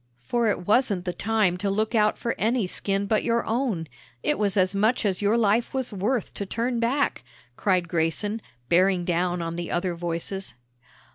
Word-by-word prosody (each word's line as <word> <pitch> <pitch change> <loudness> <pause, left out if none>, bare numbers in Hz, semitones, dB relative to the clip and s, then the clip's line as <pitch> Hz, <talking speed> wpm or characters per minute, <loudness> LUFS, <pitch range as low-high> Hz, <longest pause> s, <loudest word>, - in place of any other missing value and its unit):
"For 235 - +1
it 190 -4 -1
wasn't 205 -4 +2
the 180 - -2
time 210 -4 +1
to 200 +2 -1
look 215 +4 0
out 215 -2 +3
for 230 - -2
any 230 0 +1
skin 195 +2 -1
but 215 +1 +1
your 235 0 +1
own; 225 -8 -1 0.4
it - - +1
was 205 -1 +1
as 185 0 +3
much 215 +4 +2
as 190 -2 0
your 205 +3 +3
life 230 +3 +2
was 260 -4 -1
worth 210 +5 -1
to 200 - -4
turn 235 +3 -1
back," 260 +5 0 0.3
cried 185 -3 +1
Grayson, 170 +6 -1 0.3
bearing 180 +2 +3
down 175 0 0
on 165 0 -4
the 175 -1 -4
other 175 0 -1
voices. 170 -3 -4
200 Hz, 185 wpm, -25 LUFS, 180-225 Hz, 0.4 s, out